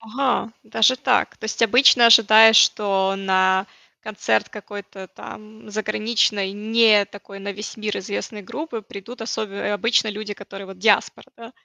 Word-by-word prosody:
Ага, 235 0 -2
даже 255 +4 +2
так. 255 -1 -1
То - - -9
есть 220 +1 -5
обычно 240 +1 +5
ожидаешь, 225 -1 +7
что 195 -3 +2
на 190 0 +1 0.4
концерт 155 - -2
какой-то 200 -2 -11
там 215 +3 -13
заграничной, 210 -2 -1
не 215 0 +3
такой 200 0 -13
на 200 +1 -6
весь 210 +2 -9
мир 215 -1 -4
известной 205 +2 -6
группы 235 - -7
придут 220 +4 -11
особе 220 -3 -5
э, 205 - -3
обычно 225 +2 0
люди, 210 0 -6
которые 195 -1 -12
вот 190 -1 -13
диаспора, 210 -1 +1
да? 230 +1 -13
210 Hz, 150 wpm, -21 LUFS, 200-225 Hz, 0.4 s, ожидаешь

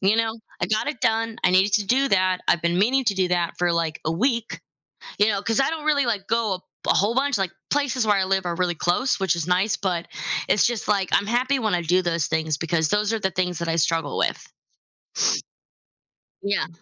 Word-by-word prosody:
you 195 +3 +3
know, 225 0 +1 0.3
I - - +2
got 215 +4 0
it 295 -4 -4
done, 225 0 0
I 180 - +4
needed 190 +2 +3
to 205 0 +2
do 265 +6 +2
that, 185 -3 +2
I've 170 - +2
been 170 +1 +1
meaning 260 +6 +3
to 200 - +2
do 185 -1 +1
that 175 -1 0
for, 175 -1 +1
like, 165 -2 -1
a 160 - 0
week, 230 +5 -1 0.6
you 205 - +4
know, 200 -2 -1
'cause 225 +4 0
I 270 +4 +2
don't 310 -2 -5
really, 285 -3 +2
like, 210 -5 -2
go 230 -3 +1
a 180 - -5
bu - - -35 0.2
a - - +4
whole 205 +4 +2
bunch 275 -1 +1
like, 190 -3 -1 0.2
places 265 -5 0
where 210 - +4
I 195 - +2
live 190 -1 0
are 170 - -2
really 180 0 0
close, 175 - 0
which 190 -3 +1
is 170 - -3
nice, 185 +4 +1
but 180 -3 -2 0.4
it's 210 - +4
just, 240 -2 -2
like, 200 -3 +1
I'm 205 - +2
happy 255 +4 +1
when 215 -6 0
I 170 - -2
do 180 +3 +2
those 170 -3 -1
things 160 -1 -1
because 160 0 0
those 210 +1 +1
are 225 - -1
the 190 - 0
things 180 -2 -2
that 170 - -3
I 165 - 0
struggle 165 -2 0
with. - - -1 2.0
Yeah. 200 0 -1
195 Hz, 235 wpm, -23 LUFS, 175-225 Hz, 2.0 s, I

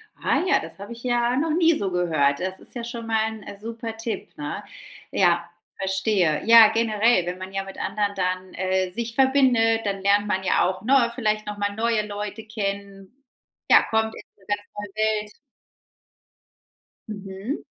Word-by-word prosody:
Ah - - 0
ja, - - +4
das - - -10
habe 205 +4 -7
ich 235 - -13
ja 240 0 +1
noch 310 +3 0
nie 330 -1 +3
so 195 -2 -2
gehört, 155 -6 +1
das 185 +1 -4
ist - - -13
ja 240 - -4
schon 235 -1 -6
mal 220 -1 +1 0.2
'n 200 - -9
super 225 0 -6
Tipp, 225 0 -5
ne? - - -5 0.5
Ja, 175 -2 +2 0.3
verstehe. 190 -4 +1
Ja, 230 -1 +9
generell, 225 -3 +2
wenn 180 +1 -4
man 190 +1 -8
ja 195 0 -2
mit 195 - -10
anderen 205 0 -2
dann, 185 0 -2
äh, 185 0 0
sich 230 +3 -4
verbindet, 250 -5 +3
dann 195 -1 -2
lernt 205 +1 +3
man 190 -2 -1
ja 190 - +3
auch, 185 +1 -2
ne, 245 0 +3
vielleicht 215 -3 -1
noch 210 0 -5
mal 205 0 -1
neue 225 -1 +1
Leute 205 +1 -5
kennen, 200 +2 -6 0.5
ja, - - +7
kommt 220 0 0
in - - -9 0.2
'ne 195 - -23
ganz 205 0 -1
neue 205 -1 -6
Welt. 215 -1 0 1.8
Mhm. 200 +4 -6
210 Hz, 175 wpm, -24 LUFS, 195-230 Hz, 1.8 s, Ja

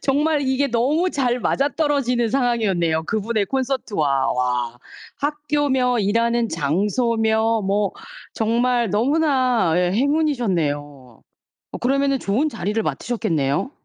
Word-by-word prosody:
정말 295 +2 +1
이게 265 +1 +1
너무 290 +10 +1
잘 250 -3 0
맞아 280 +1 +1
떨어지는 275 -7 0
상황이었네요, 200 -11 +1
그 220 +4 -1
분의 215 -1 -1
콘서트와. 205 - -1
와. 125 -1 -1 0.4
학교며 290 -4 0
일하는 230 +3 +1
장소며 220 - 0
뭐 200 +1 0 0.4
정말 235 0 +1
너무나 255 - +2
예. 180 0 +2
행운이셨네요. 175 - -1 0.5
어 - - -5
그러면은 275 +2 +1
좋은 245 +11 0
자리를 210 -2 -2
맡으셨겠네요? 170 - -1
235 Hz, 280 characters per minute, -21 LUFS, 195-270 Hz, 0.5 s, 너무나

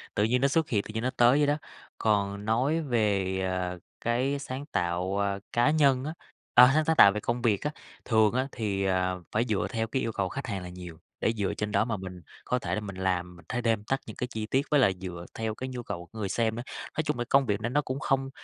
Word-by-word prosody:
tự 105 - +2
nhiên 125 +3 +2
nó 140 - +5
xuất 160 +3 +1
hiện, 105 -4 +1
tự - - -9
nhiên 110 +1 -2
nó 130 - +1
tới 120 +3 +6
vậy 145 -1 +3
đó. 145 +1 +2 0.4
Còn 100 -1 0
nói 130 +9 +1
về, 100 -8 +1
à, 90 -1 -2 0.2
cái 130 +4 0
sáng 135 0 -5
tạo, 90 - -1
à, 100 -1 0
cá 120 +5 +4
nhân 140 -4 +3
á 155 - -3 0.4
a, 125 +1 +9
sáng 155 +1 +3
sáng 160 - +2
tạo 100 - +8
về 105 - -3
công 120 +3 -2
việc 110 -5 +2
á, 150 - -1 0.3
thường 110 -2 +4
á 130 +2 0
thì, 100 -4 -2
à, 95 -1 +1 0.2
phải 115 +3 +1
dựa 105 -3 +1
theo 115 -3 -1
cái 130 +4 -1
yêu 115 - -1
cầu 95 -3 -1
khách 135 +5 -5
hàng 100 -5 -3
là 90 - -7
nhiều, 90 -2 -9 0.2
để 115 - +2
dựa 100 -2 0
trên 105 0 -3
đó 105 +2 +2
mà 115 -3 -2
mình 90 -2 -8 0.2
có 125 - 0
thể - - -2
là 110 - -2
mình 100 -3 -7
làm, 90 -1 -1
mình 85 - -16
th - - -3
thêm 115 -3 +1
thắt 135 - +1
những - - -8
cái 125 - -3
chi 110 -3 -4
tiết, 135 +5 +1
với 150 - +5
lại 115 -7 +4
dựa 90 -2 -6
theo 110 -1 -3
cái 130 +3 -5
nhu 125 -1 -5
cầu 85 - -5
của 110 - -9
người 100 -2 -2
xem 110 0 0
ấy. - - -4 0.3
Nói 155 - +2
chung 150 -4 -2
là 120 - -1
công 135 0 +5
việc 105 -2 -1
này 115 - -1
nó 145 +4 +2
cũng 135 -1 -4
không 135 0 0
110 Hz, 270 wpm, -28 LUFS, 100-130 Hz, 0.4 s, a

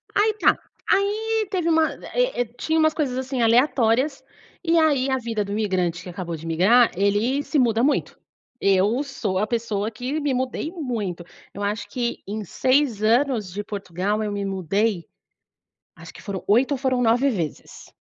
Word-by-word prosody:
Aí 430 +1 +3
tá, - - +4 0.3
aí 430 +2 +1
teve 355 -4 0
uma 320 -1 +3 0.2
eh - - +1
eh, - - 0
tinha 320 +5 0
umas 315 0 +3
coisas 275 -6 -1
assim, 260 -1 -2
aleatórias, 245 +3 +2 0.4
e 335 -1 +2
aí 285 -5 +3
a 265 - +1
vida 230 -4 -2
do 200 - -7
imigrante 185 -5 -1
que 180 - -8
acabou 175 -1 -5
de 160 +1 -10
migrar, 200 +9 +4
ele 205 +9 +1
se 300 - -1
muda 230 -2 +2
muito. 290 +2 0 0.4
Eu 200 +6 +3
sou 220 -9 -3
a 210 - 0
pessoa 220 -2 -1
que 250 +7 -3
me 290 -3 0
mudei 255 +4 -2
muito. 230 - -4 0.3
Eu 200 - -6
acho 210 +2 -2
que 240 -2 -3
em 210 +2 -4
6 255 - +1
anos 230 -3 +2
de 205 +2 -4
Portugal 205 0 -3
eu 210 - -2
me 200 0 -3
mudei 195 0 -1 0.9
acho - - -12
que - - -12
foram 195 -3 -5
8 240 +7 +3
ou - - -1
foram 260 -1 0
9 245 +4 +3
vezes. 170 - -5
235 Hz, 175 wpm, -23 LUFS, 200-275 Hz, 0.9 s, tá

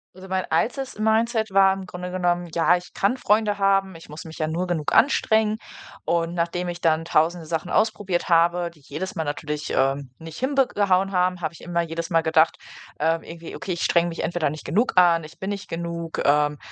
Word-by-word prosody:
Also 190 +1 -11
mein 185 -1 -1
altes 250 - -1
Mindset 220 0 +1
war 195 0 +5
im 190 -1 -6
Grunde 180 0 -7
genommen: 175 -1 -1
„Ja, 170 +1 +4
ich 180 0 -7
kann 205 +6 +1
Freunde 210 -3 +1
haben, 195 -2 +2
ich 165 - -13
muss 150 +2 -9
mich 160 0 -10
ja 155 - 0
nur 170 +3 -2
genug 165 -4 -2
anstrengen“ 220 -4 +3 0.5
und 170 0 0
nachdem 175 +1 -2
ich 175 0 -5
dann 165 0 +2
tausende 165 +1 +1
Sachen 165 +2 -3
ausprobiert 205 -5 0
habe, 170 0 +3
die 160 - -22
jedes 155 +8 -5
Mal 160 - -1
natürlich, 150 0 -4
ähm, 135 0 0
nicht 160 0 -10
hinbek 270 0 +1
gehauen 195 -1 +2
haben, 180 -1 +1
habe 160 0 -3
ich - - -14
immer 170 0 -1
jedes 165 0 -4
Mal 165 -1 +3
gedacht, 160 0 +3 0.4
ähm, 165 +2 +1
irgendwie: 165 0 -9
„Okay, 185 - -4
ich 170 - -4
strenge 170 0 +3
mich 170 - -4
entweder 170 -4 0
nicht 155 +1 -8
genug 225 +8 +1
an, 170 -2 +5
ich 155 - -12
bin 190 +2 -4
nicht 200 0 -6
genug, 170 -1 -4
ähm, 150 0 +3
175 Hz, 210 wpm, -23 LUFS, 165-195 Hz, 0.5 s, war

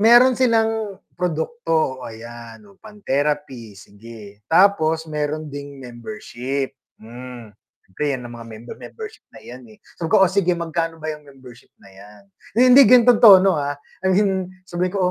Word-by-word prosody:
Meron 240 +4 +6
silang 225 -5 0 0.2
produkto, 175 +6 -3 0.4
oh, - - -7
ayan 115 - -11
yung 200 -2 -21
pang 215 -1 -14
therapy, 135 -6 -2
sige. 105 0 -14
Tapos 160 -3 +3
mayro'n 150 0 -3
ding 145 0 -8
membership, 130 - -6 0.2
hmm, 120 -1 -11 0.3
siyempre 95 +10 -6
yan 125 - -10
ang 120 - -9
mga 115 - -10
member, 115 +2 -11
membership 440 -1 -10
na - - -15
'yan, 125 +1 -10
eh, 110 - -17 0.2
sabi 165 - -2
ko, 190 - +5
"Oh, 180 - 0
sige 180 -3 +1
magkano 165 -1 -3
ba 155 -1 -5
yang 150 - -10
membership 130 -3 -16
na 100 - -19
yan?" 100 +1 -16 0.5
Hindi, 265 -3 +8
ganito 245 0 +7
yung 230 - -1
tono, 195 -4 +8
ah, 145 0 -3 0.2
I 190 - -1
mean 190 -1 +1 0.2
sabihin 180 +2 -3
ko, 190 - +1
155 Hz, 165 wpm, -20 LUFS, 120-195 Hz, 0.5 s, Hindi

